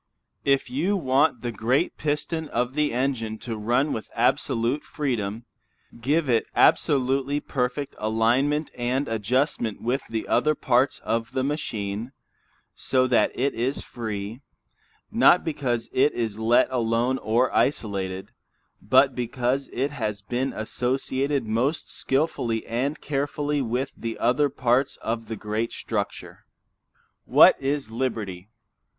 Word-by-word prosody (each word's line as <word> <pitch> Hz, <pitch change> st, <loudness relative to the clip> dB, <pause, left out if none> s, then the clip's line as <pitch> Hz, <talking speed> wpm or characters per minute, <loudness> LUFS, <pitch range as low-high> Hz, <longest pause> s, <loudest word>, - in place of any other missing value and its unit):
If 135 Hz, -1 st, +2 dB
you 175 Hz, +10 st, +1 dB
want 135 Hz, -4 st, +2 dB
the 120 Hz, -, -3 dB
great 125 Hz, -, 0 dB
piston 155 Hz, +2 st, -2 dB
of 125 Hz, +2 st, -1 dB
the 150 Hz, 0 st, +1 dB
engine 120 Hz, -3 st, -1 dB
to 115 Hz, -2 st, -3 dB
run 120 Hz, +7 st, +1 dB
with 110 Hz, -, -5 dB
absolute 120 Hz, +2 st, +1 dB
freedom, 115 Hz, -6 st, -3 dB, 0.6 s
give 150 Hz, +5 st, +1 dB
it 115 Hz, -3 st, +2 dB
absolutely 135 Hz, +1 st, +3 dB
perfect 135 Hz, 0 st, -2 dB
alignment 120 Hz, +8 st, +1 dB
and 125 Hz, +4 st, -1 dB
adjustment 115 Hz, +1 st, 0 dB
with 125 Hz, +4 st, -1 dB
the 110 Hz, -1 st, -3 dB
other 155 Hz, 0 st, +2 dB
parts 130 Hz, +1 st, +2 dB
of 115 Hz, 0 st, -2 dB
the 130 Hz, -, 0 dB
machine, 115 Hz, -5 st, -3 dB, 0.6 s
so 130 Hz, -1 st, +2 dB
that 125 Hz, -2 st, +3 dB
it 140 Hz, +3 st, 0 dB
is 125 Hz, +5 st, -1 dB
free, 110 Hz, 0 st, -5 dB, 0.7 s
not 180 Hz, -, +5 dB
because 125 Hz, -7 st, -1 dB
it 140 Hz, +3 st, +3 dB
is 110 Hz, -3 st, -3 dB
let 115 Hz, +3 st, +4 dB
alone 120 Hz, +1 st, +1 dB
or 115 Hz, +4 st, +1 dB
isolated, 95 Hz, -7 st, -1 dB, 0.5 s
but 130 Hz, +5 st, +4 dB
because 125 Hz, +2 st, -1 dB
it 135 Hz, +3 st, -1 dB
has 105 Hz, -7 st, -3 dB
been 125 Hz, +5 st, -1 dB
associated 130 Hz, +4 st, -1 dB
most 125 Hz, +8 st, -1 dB
skilfully 135 Hz, -5 st, -1 dB
and 135 Hz, +6 st, -2 dB
carefully 145 Hz, 0 st, -1 dB
with 125 Hz, +2 st, -2 dB
the 115 Hz, -1 st, -5 dB
other 135 Hz, +5 st, +2 dB
parts 130 Hz, 0 st, +1 dB
of 115 Hz, 0 st, -3 dB
the 110 Hz, -, -4 dB
great 110 Hz, +2 st, -3 dB
structure. -, -, -4 dB, 0.8 s
What -, -, +7 dB
it 140 Hz, -3 st, -2 dB
liberty? 110 Hz, -6 st, -3 dB
125 Hz, 130 wpm, -25 LUFS, 115-140 Hz, 0.8 s, What